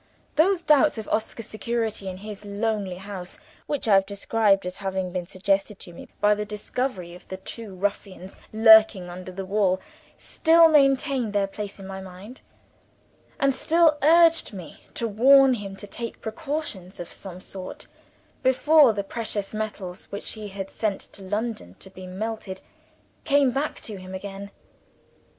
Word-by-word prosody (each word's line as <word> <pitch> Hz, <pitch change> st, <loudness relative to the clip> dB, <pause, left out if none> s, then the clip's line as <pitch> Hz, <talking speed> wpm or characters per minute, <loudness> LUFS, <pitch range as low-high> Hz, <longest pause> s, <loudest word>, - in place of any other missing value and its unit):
Those 350 Hz, +2 st, +3 dB
doubts 300 Hz, -3 st, +4 dB
of 220 Hz, -, -6 dB
Oscar's 220 Hz, +1 st, -2 dB
security 220 Hz, -3 st, -3 dB
in 185 Hz, -, -7 dB
his 210 Hz, +1 st, -9 dB
lonely 205 Hz, -2 st, -2 dB
house, 190 Hz, -1 st, -8 dB, 0.3 s
which 290 Hz, -5 st, -2 dB
I 210 Hz, -, +5 dB
have 195 Hz, 0 st, +4 dB
described 200 Hz, -1 st, +1 dB
as 180 Hz, +1 st, -5 dB
having 190 Hz, -2 st, -3 dB
been 175 Hz, -1 st, -4 dB
suggested 195 Hz, +2 st, -1 dB
to 175 Hz, -, -10 dB
me -, -, -11 dB
by 210 Hz, 0 st, +4 dB
the 210 Hz, 0 st, -2 dB
discovery 210 Hz, -3 st, -4 dB
of 180 Hz, -, -14 dB
the 190 Hz, -, -6 dB
two 200 Hz, +1 st, -9 dB
ruffians 190 Hz, -1 st, -4 dB, 0.2 s
lurking 220 Hz, -4 st, +6 dB
under 185 Hz, +1 st, -8 dB
the 190 Hz, +1 st, -6 dB
wall, 190 Hz, -1 st, +1 dB, 0.4 s
still 330 Hz, 0 st, +4 dB
maintained 275 Hz, -5 st, +3 dB
their 200 Hz, -1 st, +2 dB
place 200 Hz, +1 st, -7 dB
in 195 Hz, -, -9 dB
my 190 Hz, 0 st, -7 dB
mind; 190 Hz, +6 st, -11 dB, 1.0 s
and 275 Hz, -2 st, +3 dB
still 315 Hz, +2 st, +3 dB
urged 330 Hz, -1 st, +5 dB
me 180 Hz, -5 st, -10 dB
to 230 Hz, -, -1 dB
warn 265 Hz, +5 st, +6 dB
him 200 Hz, -4 st, -5 dB
to 200 Hz, -, -8 dB
take 230 Hz, +3 st, -7 dB
precautions 220 Hz, -, -4 dB
of 175 Hz, -, -7 dB
some 185 Hz, -2 st, -7 dB
sort, 185 Hz, 0 st, -8 dB, 0.6 s
before 275 Hz, 0 st, +5 dB
the 200 Hz, -1 st, -2 dB
precious 205 Hz, -1 st, -4 dB
metals 210 Hz, -4 st, -5 dB
which 200 Hz, -, -5 dB
he 215 Hz, -2 st, -7 dB
had 195 Hz, -1 st, -7 dB
sent 210 Hz, -3 st, -2 dB
to 200 Hz, -, -12 dB
London 205 Hz, -, -4 dB
to 190 Hz, -, -14 dB
be 185 Hz, -1 st, -10 dB
melted, 205 Hz, 0 st, -5 dB, 0.6 s
came 280 Hz, -2 st, +3 dB
back 275 Hz, +4 st, -2 dB
to 210 Hz, -3 st, -6 dB
him 185 Hz, 0 st, -8 dB
again. 200 Hz, +1 st, -7 dB
205 Hz, 160 wpm, -25 LUFS, 190-240 Hz, 1.0 s, lurking